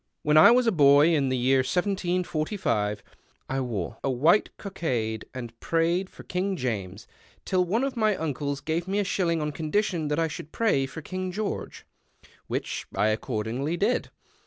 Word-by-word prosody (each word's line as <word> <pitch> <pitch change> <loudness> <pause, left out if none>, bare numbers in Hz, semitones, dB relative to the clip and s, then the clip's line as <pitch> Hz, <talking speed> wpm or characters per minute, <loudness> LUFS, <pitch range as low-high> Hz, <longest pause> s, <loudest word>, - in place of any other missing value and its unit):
When 150 0 +2
I 155 - +9
was 245 +1 +4
a 230 - +3
boy 145 -1 +6
in 140 -4 +2
the 130 - 0
N'ear 130 +2 +3
1745 175 - -1 0.4
I 135 0 -1
wore 115 -4 -4
a 135 - 0
white 155 +11 +3
cockade 120 - -3
and 120 -2 -8
prayed 170 +3 0
for - - -13
Kin^ 190 +2 -2
James, 105 - -4 0.4
till 185 -2 +2
one 220 +8 0
of 275 -1 -2
my 215 -3 +2
uncles 145 -2 -3
gave 165 +4 -2
me 195 +2 -1
a 205 - +2
shilling 170 -5 0
on 150 - -2
condition 160 +2 -1
that 150 0 -1
I 165 0 +2
should 155 0 -8
pray 170 -13 +1
for 160 +3 -9
King 185 +3 -4
George, 210 +2 -4 0.6
which - - -3
I 110 - +2
accordingly 115 +7 -2
did. 215 +7 0
155 Hz, 170 wpm, -26 LUFS, 130-185 Hz, 0.6 s, I